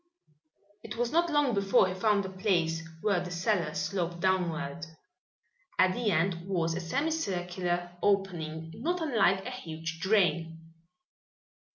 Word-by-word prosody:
It 220 +1 -8
was 240 0 0
not 340 +1 +3
long 295 -5 +2
before 195 -2 +4
he 185 - -3
found 205 +1 +2
a - - -4
place 180 -4 0 0.2
where 200 -4 +2
the 180 0 -5
cellar 175 -3 0
sloped 175 -3 -2
downward. 170 -4 -1 0.9
At 185 0 +4
the 240 -1 0
end 170 0 0
was 170 -4 0
a 170 - -2
semi 280 - -1
circular 175 - -2
opening, 165 -5 0
not 350 +3 -1
unlike 215 - +2
a 250 - -4
huge 165 -8 -6
drain. 165 -4 +1
185 Hz, 140 wpm, -30 LUFS, 170-210 Hz, 0.9 s, before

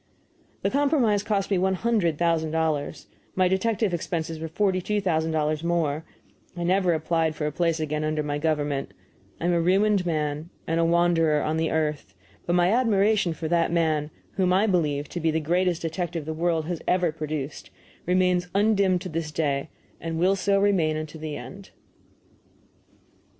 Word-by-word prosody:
The - - +1
compromise 275 -8 +2
cost 205 -1 -1
me 190 - +3
one 190 +1 +1
hundred 185 -7 +1
thousand 165 -1 +1
dollars; 155 -2 -1 0.3
my 185 -1 +3
detective 195 +1 0
expenses 165 -1 -3
were 160 - -4
forty 185 +3 0
two 210 +3 -1
thousand 160 -5 0
dollars 155 0 0
more; 165 -3 0 0.5
I 175 - -2
never 180 0 +2
applied 160 0 0
for 155 - -3
a 150 - -1
place 165 +1 0
again 155 0 -2
under 155 0 -1
my 145 0 -2
government; 145 -3 -1 0.4
I - - -3
am 175 - +2
a 170 - +2
ruined 195 +3 +3
man 155 -1 -2 0.2
and 165 +1 0
a 165 - +3
wanderer 165 -3 +3
in 155 +1 0
the 160 0 0
earth, 150 -10 -2 0.3
but 175 - +1
my 175 +1 +3
admiration 215 -6 +2
for 160 0 -5
that 170 -1 +2
man, 155 -3 +1 0.3
whom 185 -2 +2
I 190 +4 +4
believe 150 -7 0
to 175 - -4
be 165 -1 +1
the 160 +1 +1
greatest 175 +2 0
detective 165 -1 -3
the 160 - -3
world 165 -1 0
has 170 0 -4
ever 180 -2 +2
produced, 155 -2 -5 0.4
remains 180 0 +2
undimmed 200 -3 +3
to 185 - -6
this 160 -1 -3
day, 145 -1 -1 0.3
and 165 -1 -4
will 185 +4 +3
so 195 +1 +1
remain 180 -6 +2
unto 155 0 -6
the 155 -1 -5
end. 190 +11 -10
165 Hz, 175 wpm, -25 LUFS, 155-185 Hz, 0.5 s, I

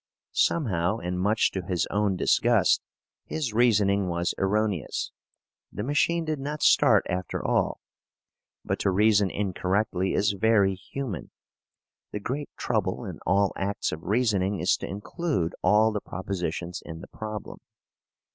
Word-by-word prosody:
Somehow 105 - +1
and 90 -4 -3
much 105 +4 +2
to 95 - -3
his 90 -2 -1
own 100 -2 +1
disgust, - - +3 0.4
his 145 -8 -3
reasoning 100 -4 +3
was 85 +1 -1
erroneous. 100 -5 0 0.6
The 105 - -4
machine 160 +5 +1
did 155 -2 -2
not 150 +2 -4
start - - +5
after 90 -1 -3
all. - - +1 0.9
But - - -1
to - - +1
reason 105 0 +4
incorrectly 95 0 -1
is 105 +1 +2
very 100 -1 +3
human. 105 - -6 0.8
The 105 - -3
great 140 +8 -4
trouble - - -1
in - - -7
all 100 +2 +3
acts 100 +1 -2
of 80 - -5
reasoning 100 -2 +1
is 90 +3 +3
to - - -6
include 105 - -2
all 110 +1 +4
the 105 -1 -3
propositions 90 -2 -4
in 80 0 -8
the - - -10
problem. 110 -1 -7
100 Hz, 135 wpm, -26 LUFS, 90-110 Hz, 0.9 s, start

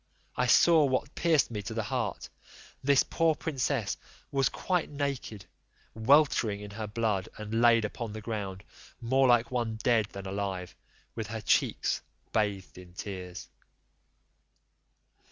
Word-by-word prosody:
I 125 - +1
saw 160 +5 +6
what 135 +1 -1
pierced 160 -7 +2
me 105 -2 -3
to 110 +3 -6
the 110 - -1
heart; - - -3 0.6
this 140 0 +5
poor 165 -1 +1
princess 135 -9 -1 0.3
was 135 -1 +2
quite 180 -3 -1
naked, 140 -8 -4 0.5
weltering 115 -3 +3
in 105 0 -8
her 110 +1 -5
blood, 105 -3 -1
and 110 +2 -2
laid 115 -2 +5
upon 115 +1 -5
the 110 - -5
ground, 100 -4 -4 0.4
more 130 +3 +3
like 120 -1 +4
one 120 -3 -1
dead 110 -1 +2
than 100 -2 -9
alive, 95 -2 -4 0.4
with 110 -2 -4
her 110 +2 -4
cheeks - - +1 0.3
bathed 100 -4 -1
in 90 -1 -14
tears. 90 -2 -7
115 Hz, 135 wpm, -29 LUFS, 100-130 Hz, 0.6 s, saw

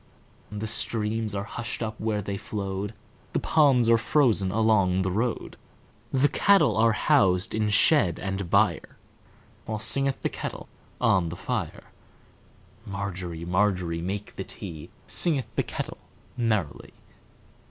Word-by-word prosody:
The 105 +1 -4
streams 110 0 -1
are 100 - -2
hushed 120 +2 -5
up 110 -1 -5
where 105 -2 -1
they 100 +1 -3
flowed, 100 0 -4 0.4
The - - +1
ponds 135 -7 +3
are 115 0 +5
frozen 115 -8 +2
along 100 -4 +2
the 95 - -1
road, 115 +5 -2 0.5
The 135 +2 +3
cattle 195 +7 +4
are 115 0 +4
housed 90 -3 +3
in 110 -1 0
shed 105 - +5
and 95 -2 -4
byreWhile 110 +4 -3
singeth 135 +4 0
the - - +2
kettle - - -6 0.3
on 90 -3 +2
the 85 - -6
fire. - - -4 1.0
Margery, 95 -5 -5
Margery, 90 -2 0
make 100 +4 -5
the 95 - -3
tea, 85 -8 -9 0.2
Singeth 150 -7 0
the - - +2
kettle - - -6 0.4
merrily. 110 - -2
105 Hz, 130 wpm, -26 LUFS, 95-115 Hz, 1.0 s, are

